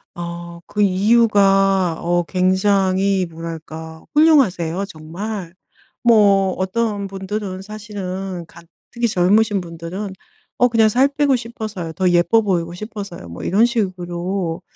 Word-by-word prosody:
어 170 0 -7
그 210 - -2
이유가 195 -3 +3
어 175 0 +1
굉장히 190 +1 +2
뭐랄까 160 -1 -8
훌륭하세요 200 - +3
정말. 180 +2 -7 0.5
뭐 200 -5 +4
어떤 205 +2 -1
분들은 195 0 -5
사실은 195 -3 -6
가 170 - -15 0.3
특히 235 0 0
젊으신 205 +1 +2
분들은 170 +4 -6 0.5
어 245 - +5
그냥 225 -2 +3
"살 255 +5 +4
빼고 280 -1 +1
싶어서요. 215 -8 -5
더 185 +1 +1
예뻐 175 +6 +4
보이고 175 -5 -1
싶어서요." 200 - -8
뭐 85 0 -8
이런 210 +5 +3
식으로 185 -5 -2
195 Hz, 255 characters per minute, -20 LUFS, 175-215 Hz, 0.5 s, 어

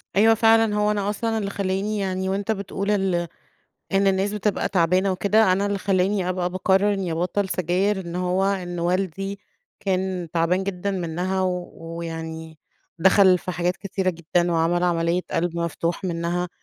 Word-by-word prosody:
أيوه 220 +3 +6
فعلًا 225 -1 +4
هو 210 0 +2
أنا 205 -1 -1
أصلًا 225 +2 -1
اللي 200 -2 -2
خلاني 200 +2 -2
يعني 190 -1 -2
وأنت 200 +2 -1
بتقول 200 0 -2
ال 190 -4 +1 0.7
إن 195 +1 +3
الناس 195 +1 +1
بتبقى 210 -1 -1
تعبانة 185 +1 +2
وكده، 200 +1 +3
أنا 195 +2 +1
اللي 200 -1 -1
خلاني 190 0 +1
أبقى 180 -1 -1
باقرر 190 +2 +2
إني 185 -4 -2
أبطل 185 +4 -1
سجاير، 185 +4 0
إن 170 -1 -6
هو 180 +1 0
إن 180 -3 -2
والدي 190 +3 -1 0.4
كان 185 -2 -1
تعبان 175 +3 +1
جدًا 200 0 -3
منها 185 +1 -2
ويعني، 165 -3 -5 0.4
دخل 190 0 +5
في 180 - -5
حاجات 175 +1 -1
كتيرة 190 -2 -1
جدًا 170 +1 0
وعمل 165 +2 +1
عملية 170 0 +1
قلب 170 0 -1
مفتوح 170 +1 -2
منها، 175 0 -1
185 Hz, 155 wpm, -23 LUFS, 175-200 Hz, 0.7 s, أيوه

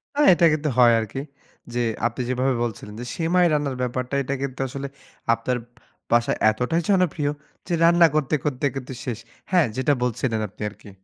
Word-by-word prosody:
হ্যাঁ, 295 0 +4
এটা 170 - +4
কিন্তু 155 0 -1
হয় 120 -2 +7
আরকি 110 +4 -4 0.5
যে 120 - -1 0.3
আপনি 120 +2 -5
যেভাবে 130 +1 +1
বলছিলেন 105 -2 -5
যে 120 - -5
সেমাই 175 +2 +2
রান্নার 145 -3 0
ব্যাপারটা 125 +1 -2
এটা 135 - -3
কিন্তু 135 -2 -4
আসলে 140 +1 -5 0.5
আপনার 115 +2 -1 0.5
বাসায় 120 0 +3
এতটাই 125 +10 0
জনপ্রিয় 170 -7 +2 0.4
যে - - -2
রান্না 170 0 +6
করতে, 150 -1 +1
করতে, 145 -1 -1
করতে 130 -1 -5
শেষ। 120 -4 -4 0.3
হ্যাঁ 180 -4 +5
যেটা 140 +3 +2
বলছিলেন 120 -1 -1
আপনি 95 - -17
আরকি। 105 0 -15
130 Hz, 170 wpm, -23 LUFS, 120-155 Hz, 0.5 s, হয়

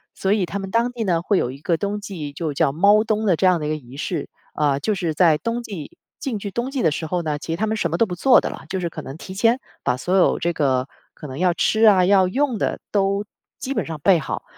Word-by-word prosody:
所 190 - -1
以 200 -4 +1
他 200 - -4
们 195 -1 -6
当 235 +2 +1
地 240 -2 -4
呢， 170 -5 +1
会 195 +2 +1
有 125 - 0
一 135 - -10
个 165 +2 0
冬 205 +3 -2
季 170 -8 -6
就 155 0 -3
叫 135 - +2
猫 200 +7 +4
冬 215 0 -1
的 180 - +4
这 190 - 0
样 180 -2 +4
的 150 - -3
一 - - -2
个 155 - 0
仪 135 -2 -11
式。 160 0 -3 0.3
呃， 145 -2 +1
就 210 +9 0
是 170 -4 -2
在 160 -2 +4
冬 235 +1 -3
季 190 -10 -8 0.2
进 260 -7 -3
去 200 0 -5
冬 240 +6 -2
季 270 - -2
的 160 - +3
时 160 +2 -3
候 180 +1 -1
呢， 150 -2 -1
其 165 - -6
实 165 - -1
他 220 - 0
们 220 - 0
什 170 - 0
么 170 - 0
都 230 - +4
不 180 - -5
做 250 +8 +5
的 - - -3
了。 - - -9
就 190 - -2
是 175 - -2
可 155 - -7
能 135 +1 -8
提 185 - -9
前 230 +6 +2 0.2
把 125 - +1
所 180 +8 -1
有 190 - +4
这 170 0 -1
个 130 -4 +1 0.3
可 - - -11
能 135 0 -7
要 180 0 +3
吃 220 +1 +1
啊， 190 -4 +6
要 190 -1 +4
用 255 +2 0
的 - - -1
都 200 0 +1 0.3
基 270 - -4
本 - - -2
上 160 -2 -5
备 185 -4 +5
好， 135 - -4
185 Hz, 310 characters per minute, -22 LUFS, 155-210 Hz, 0.3 s, 啊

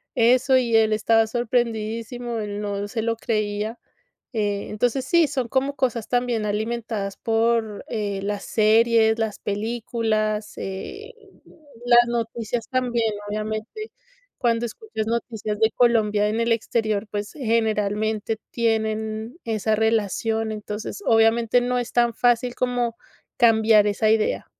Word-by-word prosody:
eso 255 +2 +4
y 240 -2 0
él 220 -1 +4
estaba 225 +1 +3
sorprendidísimo, 230 0 -2
él 205 -1 -4
no 205 -1 -3
se 225 +2 -3
lo 230 +1 0
creía. 215 0 -2 0.6
Eh, 205 -3 -1
entonces, 245 +4 0
sí, 340 -2 +4
son 260 -4 -2
como 275 +3 0
cosas 240 -5 -1
también 245 -3 0
alimentadas 215 -1 -3
por, 225 -1 0
eh, 205 -3 -2
las 205 0 -3
series, 225 +1 +3
las 220 -2 -2
películas, 215 0 -2
eh, 400 - -7 0.7
las 240 0 +6
noticias 230 -1 -3
también, 240 -3 0 0.2
obviamente. 215 - -4 0.5
Cuando 235 -1 +1
escuchas 220 - -5
noticias 220 -2 -3
de 220 0 +3
Colombia 215 -4 +2
en 220 - -1
el 230 0 0
exterior, 220 -2 -1
pues, 205 0 -4
generalmente 220 -3 0
tienen 220 +2 -1
esa 220 -1 0
relación, 220 0 0
entonces, 210 - -6
obviamente, 225 +1 +4
no 250 0 0
es 240 - -4
tan 240 -1 +3
fácil 245 +1 +1
como 245 -2 -1 0.4
cambiar 220 -2 +5
esa 215 +1 +1
idea. 220 -1 +1
225 Hz, 125 wpm, -23 LUFS, 215-235 Hz, 0.7 s, las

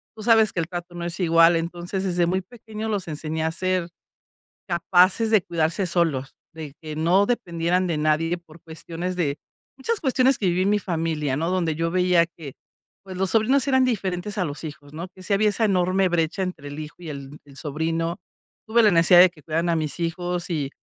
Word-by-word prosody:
tú 215 - -9
sabes 220 -2 +4
que 170 - 0
el 160 - -4
trato 175 0 -7
no 175 - -5
es 170 +1 -4
igual. 165 -1 +5
Entonces, 175 +3 -4
desde 175 -2 +1
muy 185 +2 0
pequeños 220 +1 -8
los 200 -4 -2
enseñé 155 +1 -3
a 160 - 0
ser 185 0 -1 0.8
capaces 185 +5 +3
de 215 - +5
cuidarse 170 +3 -1
solos, 155 -6 0 0.2
de 155 -3 -8
que 155 -1 -7
no 175 +5 +3
dependieran 180 -5 0
de 165 - -1
nadie 155 +3 +1
por 170 -1 -18
cuestiones 170 +2 -6
de 150 -5 -1 0.4
muchas 425 +11 -1
cuestiones 265 -2 +3
que 205 - -3
viví 180 +1 +1
en 195 - +1
mi 210 - +3
familia, 160 -7 -2
¿no?, 165 +3 -1
donde 175 -4 0
yo 165 +1 -1
veía 180 -1 +3
que, 145 -5 -8 0.5
pues, 190 -2 -8
los 190 0 0
sobrinos 255 +5 +2
eran 260 -1 +4
diferentes 200 -3 -2
a 185 - +1
los 145 0 -6
hijos, 145 -2 -9
¿no?, 170 +4 -6
que 185 - -13
si 200 - -1
había 210 +1 +3
esa 220 +2 +1
enorme 185 -1 +2
brecha 170 +2 0
entre 170 -6 -6
el 145 - -8
hijo 155 0 -8
y 170 - -8
el 140 0 -8
el 140 -1 -16
sobrino. 165 +3 -2 0.5
Tuve 230 +1 +4
la 210 - +5
necesidad 170 0 +6
de 185 - +7
que 155 - -19
cuidaran 165 +2 -1
a 170 - +2
mis 155 +1 -2
hijos 175 +1 -3
y 145 -5 -1
175 Hz, 210 wpm, -23 LUFS, 160-190 Hz, 0.8 s, de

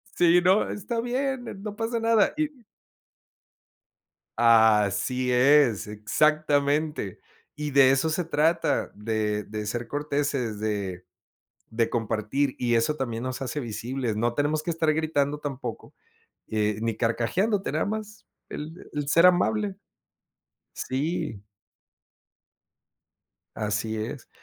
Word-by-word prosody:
sí 175 0 +5
no, 190 +3 +3
está 230 +3 -3
bien, 255 +1 -2 0.2
no 210 -1 -5
pasa 230 +1 -1
nada 225 -2 +3
y 310 -1 +1 1.9
Así 115 +2 +4
es, 125 -4 +4
exactamente, 145 - +1 0.4
y 150 -1 -4
de 135 -1 +6
eso 135 +4 +2
se 180 +3 0
trata, 165 +1 +1
de 105 0 -2
de 105 0 -5
ser 115 +2 -3
corteses, 140 -6 -2
de 100 -4 -3 0.6
de 115 0 0
compartir, 115 +4 -1
y 120 -1 0
eso 115 +7 +2
también 120 -5 -3
nos 130 +1 -4
hace 145 +3 -3
visibles. 120 0 -3
No 120 +2 0
tenemos 150 +3 0
que 170 - -1
estar 160 -1 +1
gritando 150 -2 0
tampoco, 135 -5 -6 0.5
eh, 105 -1 0
ni 115 -1 -1
carcajeándote, 185 - 0
nada - - 0
más 215 0 -5 0.2
el 160 +4 -8
el 145 -1 -3
ser 165 +4 +6
amable. 200 +3 +2 1.0
Sí. 145 - -3 2.1
Así 105 +1 -2
es. 120 +4 -6
140 Hz, 115 wpm, -26 LUFS, 115-160 Hz, 2.1 s, de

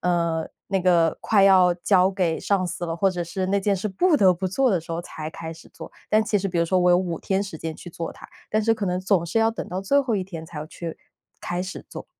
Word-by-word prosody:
嗯， 170 -2 0 0.2
那 195 -1 +1
个 170 -3 +3
快 205 -3 +3
要 185 -2 +6
交 185 +1 +3
给 180 -4 0
上 195 -2 +1
司 175 - -4
了， 165 - -2
或 195 +3 +3
者 180 -1 -3
是 185 +2 -3
那 200 +1 +1
件 200 0 +1
事 195 +3 -3
不 310 - +2
得 190 -7 +5
不 185 +2 -3
做 260 +7 +2
的 185 -5 +1
时 165 - -13
候 165 - -2
才 155 -2 -7
开 160 0 -7
始 165 - -15
做， - - -10 0.2
但 215 +1 +4
其 210 - +1
实 195 0 -2
比 175 - -2
如 170 - +3
说 185 +2 +1
我 180 0 +4
有 175 - +6
5 175 -3 -2
天 190 0 0
时 190 -5 -7
间 160 0 -5
去 175 - -10
做 165 0 -5
它， - - -13 0.2
但 215 0 +1
是 225 +1 +3
可 215 - -4
能 180 0 -1
总 185 -2 +2
是 170 +7 -1
要 225 0 +3
等 225 - -6
到 185 +1 -3
最 280 +9 +3
后 255 -5 -1
1 190 - -1
天 165 -4 -8
才 160 -1 -9
要 150 - -5
去 165 +1 -6
开 - - -10
始 - - -38 0.9
做。 - - -8
185 Hz, 290 characters per minute, -24 LUFS, 170-195 Hz, 0.9 s, 要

